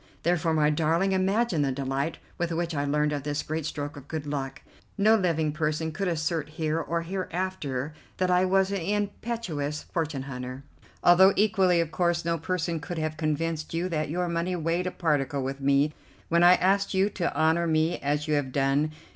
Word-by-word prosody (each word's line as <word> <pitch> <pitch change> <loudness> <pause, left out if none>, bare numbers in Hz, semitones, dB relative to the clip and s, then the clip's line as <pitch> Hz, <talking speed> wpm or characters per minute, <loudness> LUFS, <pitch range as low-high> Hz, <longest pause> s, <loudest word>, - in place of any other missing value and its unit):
Therefore, 170 -1 +1
my 150 -1 +3
darling, 165 +5 +1
imagine 190 -1 +1
the 140 -2 +1
delight 135 +3 -2 0.2
with 175 0 -1
which 170 0 -1
I 145 -1 -1
learned 150 +1 +1
of 145 - -2
this 145 +1 -2
great 155 0 -3
stroke 145 +1 -5
of 140 -1 -11
good 155 -2 -4
luck. 135 -2 -4 0.3
No 215 +2 +5
living 165 -6 +1
person 155 +1 -1
could 190 +5 -2
assert 160 -2 -1
here 155 +1 -1
or 165 0 -2
hereafter 175 -6 -3 0.2
that 185 -1 +1
I 180 0 +4
was 190 +1 +2
an 200 -2 -1
impecunious 200 -6 -2
fortune 155 -5 -3
hunter, 130 0 -6 0.4
although 190 +3 +7
equally, 195 -4 +3
of 165 -1 -3
course, 170 -1 0
no 170 -1 0
person 170 0 -2
could 160 +4 -6
have 155 0 -2
convinced 155 +1 -2
you 175 +2 0
that 155 -3 -1
your 175 +3 -1
money 170 +2 -1
weighed 170 +2 -1
a - - -2
particle 145 -5 0
with 135 +1 -4
me 140 +2 +3 0.4
when 170 0 +3
I 175 +1 +8
asked 195 +2 +1
you 190 +1 +4
to 175 -3 -2
honour 160 +2 +3
me 160 +2 +1
as 145 +2 -1
you 155 - +1
have 145 -3 0
done. 140 +3 +1
160 Hz, 190 wpm, -27 LUFS, 150-180 Hz, 0.4 s, I